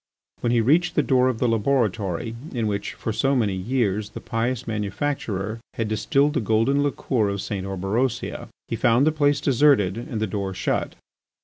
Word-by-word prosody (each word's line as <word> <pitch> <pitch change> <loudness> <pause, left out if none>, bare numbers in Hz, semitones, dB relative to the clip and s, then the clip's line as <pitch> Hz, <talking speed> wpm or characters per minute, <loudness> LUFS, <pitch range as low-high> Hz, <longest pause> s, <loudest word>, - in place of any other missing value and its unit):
When 120 - 0
he 120 -1 +3
reached 165 +9 +3
the 150 - +3
door 130 -1 +3
of 130 -3 0
the 125 - +1
laboratory 115 -3 0 0.2
in 115 -2 0
which, 100 -1 -2
for 110 - -3
so 135 +5 +1
many 110 -6 +1
years, 105 0 -1
the - - -8
pious 120 +2 -2
manufacturer 105 -1 -3 0.2
had 115 -2 -2
distilled 140 +7 +2
the 150 - +1
golden 115 +6 +2
liqueur 130 -6 0
of 100 0 -3
St. 95 -1 -4
Orberosia, 105 +6 -2 0.2
he - - -2
found 120 +5 +3
the 155 - +4
place 145 -2 +2
deserted 130 -8 +3
and 115 -2 -5
the 110 - +1
door 100 -2 -3
shut. - - -1
115 Hz, 180 wpm, -24 LUFS, 105-135 Hz, 0.2 s, the